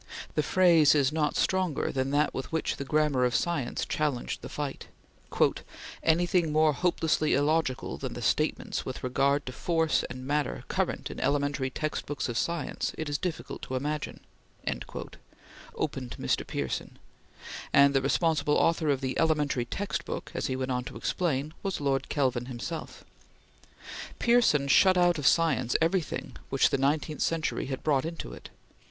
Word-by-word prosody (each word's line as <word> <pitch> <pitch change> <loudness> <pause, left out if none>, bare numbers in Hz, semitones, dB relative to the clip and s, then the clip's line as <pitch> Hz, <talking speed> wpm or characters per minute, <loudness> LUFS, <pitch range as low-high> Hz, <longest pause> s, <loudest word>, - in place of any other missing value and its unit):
The - - +2
phrase 165 -1 +5
is 140 -3 +3
not 150 -2 0
stronger 185 -6 +1
than 130 0 -1
that 145 +2 +2
with 135 - -5
which 160 -1 -1
the - - -3
"Grammar 150 -2 +2
of 125 -1 +2
Science" 160 -8 -1
challenged 150 -5 -2
the - - -8
fight: 145 -2 -5 1.1
"Anything 170 0 +2
more 155 0 +4
hopelessly 160 -2 +1
illogical 145 -2 0
than - - -4
the - - -6
statements - - 0
with - - -6
regard 140 +3 +1
to 130 - -5
Force 160 +3 +1
and 130 +1 -7
Matter 145 +1 -1
current - - -2
in - - -7
elementary 140 -2 0
textbooks 145 0 -3
of 120 - -4
science, 170 -4 -2
it 160 -2 -3
is 145 -1 -1
difficult 180 -3 -4
to 130 - -5
imagine," 150 +3 -3 1.5
opened 130 -5 -3
Mr. - - 0
Pearson, 70 -3 -4 0.7
and 140 0 +6
the 135 - +3
responsible 150 +1 +2
author 165 -2 +2
of 140 -2 +1
the 130 -1 -2
"elementary 150 -6 +1
textbook," 200 +11 -4
as - - -2
he 130 - -1
went 130 0 -2
on 125 0 -1
to - - -7
explain, 155 -4 -1
was 195 -2 -2
Lord 135 -2 0
Kelvin 130 -4 0
himself. 145 +6 -6 1.1
Pearson 235 - +3
shut 185 +6 +5
out 175 -2 +3
of 145 - +2
science 150 -8 +3
everything 165 0 -1
which 135 - +3
the 140 - +1
nineteenth 150 +2 0
century 165 -4 0
had 130 -1 -4
brought 140 -4 +2
into 165 - -5
it. - - -11
150 Hz, 155 wpm, -28 LUFS, 135-160 Hz, 1.5 s, and